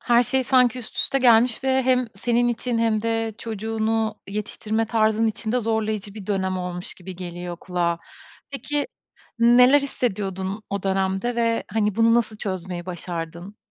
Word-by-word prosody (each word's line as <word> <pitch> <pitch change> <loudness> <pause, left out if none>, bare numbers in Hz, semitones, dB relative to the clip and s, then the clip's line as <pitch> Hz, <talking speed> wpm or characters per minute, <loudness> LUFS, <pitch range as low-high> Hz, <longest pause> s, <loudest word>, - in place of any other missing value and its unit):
Her 240 0 +4
şey 260 +2 +1
sanki 250 -1 +3
üst 230 - -9
üste 275 - +1
gelmiş 245 0 +4
ve 265 0 +3
hem 255 -1 +2
senin 240 +4 +1
için 240 0 -1
hem 225 -2 +1
de 225 -1 -1
çocuğunu 220 0 -2
yetiştirme 215 +2 -2
tarzın 220 0 +2
için 220 0 -2
de 250 - +2
zorlayıcı 215 -2 -2
bir 210 -3 -9
dönem 190 -2 -1
olmuş 180 0 -5
gibi 185 0 -9
geliyor 175 -1 -6
kulağa. 175 -2 -1 0.5
Peki, 290 +3 -2 0.5
neler 250 +4 +6
hissediyordun 200 -6 -3
o 200 -1 -2
dönemde 195 +4 0
ve, 230 -1 +1
hani, 210 -1 0
bunu 230 0 +5
nasıl 225 -2 +1
çözmeyi 185 -3 -5
başardın? 175 +2 -6
220 Hz, 155 wpm, -23 LUFS, 190-235 Hz, 0.5 s, neler